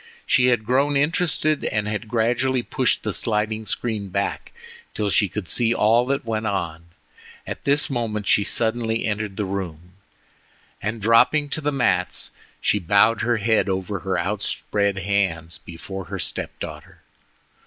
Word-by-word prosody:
She 125 - +4
had 120 -3 +2
grown 140 +4 +2
interested, 155 0 +1
and 105 -1 -1
had 105 +1 -3
gradually 120 +3 +1
pushed 130 0 +1
the 105 - -2
sliding 110 0 -1
screen 110 -5 -3
back 100 +2 -2 0.4
till 105 -2 0
she 105 -2 +3
could 100 0 -5
see 115 +3 +2
all 115 +4 +3
that 140 -1 -1
went 110 -1 -2
on. 85 -5 -3 0.6
At - - -7
this 145 +1 +3
moment 115 -5 -2
she 105 - +4
suddenly 115 +1 0
entered 105 -2 -2
the 105 - -1
room, 90 -3 -5 0.9
and 110 0 -3
dropping 145 +7 +4
to 155 - -2
the 150 0 0
mats, 135 -3 0 0.3
she 105 - +1
bowed 100 +5 +3
her 120 0 +1
head 110 -2 +2
over 95 +1 -2
her 95 -1 -2
outspread 100 +1 -1
hands 95 -4 -1
before 95 +3 -8
her - - -5
step - - -2
daughter. - - -9
110 Hz, 155 wpm, -23 LUFS, 100-120 Hz, 0.9 s, She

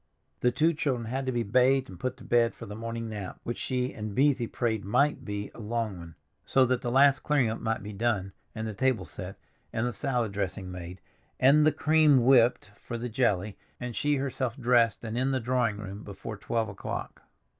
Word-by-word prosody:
The 125 - +3
two 155 +7 +2
children 130 -6 -1
had 135 +1 -2
to - - +1
be 120 -1 0
bathed 130 +5 +3
and 90 -2 -11
put 130 - -3
to - - -13
bed 120 -1 +2
for 115 - -9
the 105 - -8
morning 115 +1 -5
nap, 105 -4 -6
which 120 - -4
both - - -6
she 125 -1 -1
and 105 -4 -6
Beesy 135 -4 +2
prayed 110 -3 -1
might 140 +7 +1
be 105 -2 -5
a - - -13
long 115 -2 -2
one, 85 -1 -11 0.3
so 135 -1 +3
that 125 0 0
the 120 - -2
last 135 +2 +5
clearing 140 -7 +1
up 110 - -4
might 110 -1 -1
be 105 0 -7
done, 100 -3 -1 0.2
and 110 0 -3
the 110 - -4
table 130 +3 +1
set, 95 0 -8 0.4
and 110 - -1
the 120 - -2
salad 125 -6 -1
dressing 100 -1 -3
made, 90 0 -8 0.4
and 150 +4 +6
the - - +5
cream 155 -6 +4
whipped 120 -6 +4
for 120 - -6
the 120 +1 -4
jelly, 105 -4 0 0.2
and 125 -2 -5
she 145 0 +1
herself 130 -3 -2
dressed 120 -3 +3
and 115 +1 -3
in 130 +1 +1
the 135 -1 +1
drawing 120 -3 0
room 100 0 -7
before 105 +2 -7
twelve 110 +2 -1
o'clock. 100 - -6
120 Hz, 215 wpm, -28 LUFS, 105-130 Hz, 0.4 s, and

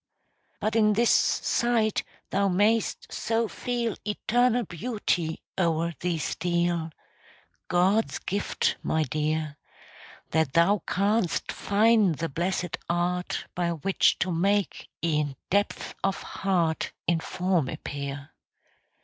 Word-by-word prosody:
But 215 +1 -1
in 215 -2 +4
this 235 +3 +3
sight 230 -3 +2 0.3
thou 200 0 +2
may'st 210 +4 +1
so 225 0 0
feel 240 -1 -2
Eternal 240 +3 +1
beauty 175 -4 -2 0.2
o'er 170 -1 +1
thee 175 -1 -1
steal 170 +1 -1 0.8
God's 190 +5 +2
gift, 200 +2 -1
my 160 0 +1
dear 155 +1 -2 0.7
That 160 -4 +1
thou 185 +4 +4
can'st 200 -1 +1
find 210 -3 +3
the 165 +2 -3
blessed 175 +3 -2
art 175 +1 -1
By 175 -1 0
which 175 +4 +2
to 185 - +1
make 195 +2 0 0.2
e'en 150 -4 0 0.2
depths 200 +2 0
of 195 0 0
heart 175 -5 -1
In 170 -1 +2
form 180 -4 0
appear. 140 0 -6
180 Hz, 110 wpm, -27 LUFS, 165-210 Hz, 0.8 s, in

